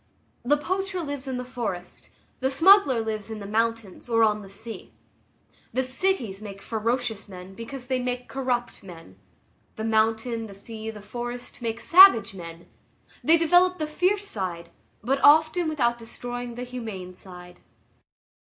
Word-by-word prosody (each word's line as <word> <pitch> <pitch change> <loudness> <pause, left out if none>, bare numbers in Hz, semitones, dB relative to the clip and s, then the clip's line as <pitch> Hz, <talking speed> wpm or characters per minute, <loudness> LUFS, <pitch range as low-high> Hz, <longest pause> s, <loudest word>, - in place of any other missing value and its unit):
The 290 +5 +3
poacher 375 +4 -2
lives 285 -3 -5
in 260 -1 -3
the 250 - -5
forest, 235 -8 -6 0.3
the 265 - +1
smuggler 290 - +5
lives 220 -1 -4
in 220 - -5
the 205 - -8
mountains 225 0 -2
or 230 -1 +4
on 210 -1 +2
the 195 - -12
sea. 220 +3 -10 0.8
The 260 - +1
cities 255 - -1
make 200 -2 -8
ferocious 225 0 -2
men 185 0 -10
because 245 +5 -8
they 260 0 -1
make 250 0 -3
corrupt 250 -3 -2
men. 165 - -13 0.6
The 220 - -5
mountain, 225 +1 +1
the 200 - -12
sea, 220 +2 -8
the 210 -2 -9
forest, 240 +3 -7
make 230 -1 -3
savage 335 - +7
men; 170 -2 -9 0.6
they 330 +1 +6
develop 355 +3 +4
the 310 - -2
fierce 365 +7 0
side, 175 - -5 0.3
but 270 +4 0
often 315 +3 +5
without 240 -6 0
destroying 245 +1 -6
the 245 - -5
humane 220 -8 -7
side. 180 -1 -13
235 Hz, 155 wpm, -25 LUFS, 210-270 Hz, 0.8 s, savage